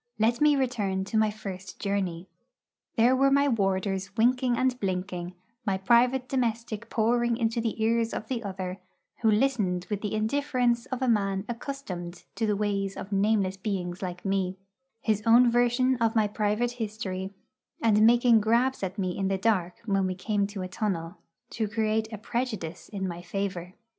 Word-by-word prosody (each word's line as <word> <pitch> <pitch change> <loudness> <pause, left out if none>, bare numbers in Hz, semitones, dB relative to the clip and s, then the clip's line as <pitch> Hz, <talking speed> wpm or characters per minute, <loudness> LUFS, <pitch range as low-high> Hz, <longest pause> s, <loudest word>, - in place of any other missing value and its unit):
Let 230 +4 +2
me 300 -1 +6
return 215 -8 0
to 200 +3 -2
my 215 -1 +3
first 200 -3 -7
journey. 190 -3 -2 0.7
There 240 +3 +5
were 275 +1 +4
my 280 +1 +4
warders 195 -4 0
winking 245 +1 +3
and 255 0 +1
blinking; 180 -2 -3 0.3
my 195 -4 0
private 245 +6 +3
domestic 230 -3 -2
pouring 235 +1 +1
into 230 -1 0
the 225 -1 -2
ears 230 0 +2
of 215 - -5
the 240 -2 -3
other, 190 -1 -5 0.4
who 225 - +4
listened 210 -6 +1
with 205 -1 -1
the 210 0 -2
indifference 245 +1 +1
of 260 0 -3
a - - +1
man 195 -4 +1
accustomed 230 -9 -6
to 225 - -1
the 210 - +2
ways 200 -1 -1
of 195 - -7
nameless 200 -1 +1
beings 185 -3 -3
like 180 0 -5
me, 190 -1 0 0.4
his 215 -2 +1
own 240 +1 +7
version 245 +2 +3
of 230 -1 +1
my 215 -2 +4
private 210 +3 0
history, 205 -5 -4 0.4
and 215 -2 +3
making 235 0 +6
grabs 235 +5 +2
at 190 +1 -3
me 185 -3 -1
in 195 -1 -1
the 195 0 0
dark 190 -4 0
when 195 -3 +1
we 185 - -2
came 200 +2 0
to 200 -2 -6
a - - -4
tunnel, 185 -2 -3 0.3
to 220 -2 -1
create 220 +1 0
a 215 - -5
prejudice 215 -6 -4
in 195 -2 -3
my 175 -1 -5
favour. 185 -1 -4
215 Hz, 175 wpm, -27 LUFS, 190-235 Hz, 0.7 s, own